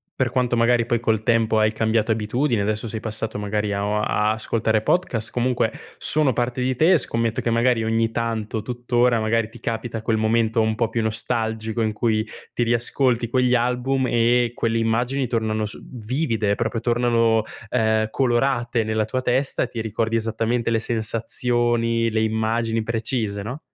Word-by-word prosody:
per 130 -2 0
quanto 125 0 0
magari 120 0 +3
poi 120 -1 0
col 110 -2 0
tempo 115 -2 +2
hai 110 0 +3
cambiato 110 0 +1
abitudine, 115 +2 0
adesso 110 +2 -1
sei 110 0 -4
passato 110 0 -4
magari 105 0 -1
a 100 0 -1
o 105 +1 0
a 105 0 +1
ascoltare 110 0 0
podcast, 115 -9 0
comunque, 125 0 0 0.3
sono 150 -4 +2
parte 125 +1 -1
di 130 +1 0
te, 160 +8 +4
e 185 - +6
scommetto 115 -2 -1
che 120 - -1
magari 115 0 +2
ogni 115 0 +1
tanto, 115 -2 -2
tutt'ora, 120 0 +1
magari 110 0 0
ti 120 0 -14
capita 115 0 -4
quel 110 0 +1
momento 110 +1 +2
un 110 0 +1
po' 115 0 0
più 115 - -1
nostalgico, 110 0 -2
in 110 -1 0
cui 110 0 +1 0.3
ti - - -2
riascolti 120 +1 +1
quegli 125 +1 +2
album 125 +2 0
e 120 0 +2
quelle 115 -1 -1
immagini 120 +4 0
tornano 110 -2 -1
s 105 - -5 0.2
vivide, 115 -3 -1
proprio 115 +2 -2
tornano, 115 -1 +2 0.3
ehm, 110 -2 +1
colorate 120 -2 +1
nella 110 0 0
tua 130 +4 -2
testa, 130 +2 +1
ti 115 -2 -5
ricordi 110 +1 -1
esattamente 115 +1 0
le 115 - +2
sensazioni, 115 +1 0
le 110 0 +1
immagini 110 +1 0
precise, 110 -2 -2
no? 125 +9 -6
115 Hz, 170 wpm, -22 LUFS, 110-120 Hz, 0.3 s, e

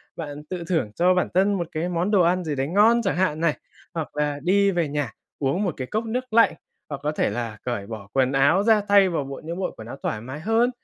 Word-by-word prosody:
bạn 150 -2 -7
tự 180 -2 -4
thưởng 160 - 0
cho 180 +2 +4
bản 180 - +1
thân 195 +3 +3
một 175 -4 -2
cái 165 +3 -2
món 180 +3 -1
đồ 200 -3 +5
ăn 180 +2 +2
gì 155 -3 -2
đấy 135 0 -1
ngon 215 +7 +4
chẳng 190 -6 -1
hạn 180 -5 +1
này, 165 -2 +1 0.4
hoặc 165 -3 -5
là 145 -1 0
đi 200 +3 +3
về 170 -4 0
nhà 145 -4 -2 0.3
uống 145 +8 0
một 180 -5 -1
cái 130 - -4
cốc 220 - -2
nước 250 +1 -4
lạnh, 230 0 +5 0.4
hoặc 140 -2 -5
có 150 - 0
thể 155 - 0
là 115 -3 -4
cởi 120 -5 -3
bỏ 110 -3 -8
quần 130 -1 +2
áo 140 +8 +3
ra, 220 -1 +4
thay 200 -2 +6
vào 165 -5 -1
bộ 135 0 -7
những 170 +3 -5
bộ 190 - -1
quần 110 - -9
áo 120 - -7
thoải 105 - -2
mái 130 +5 -7
hơn, 225 +7 +2
170 Hz, 260 wpm, -24 LUFS, 140-195 Hz, 0.4 s, thay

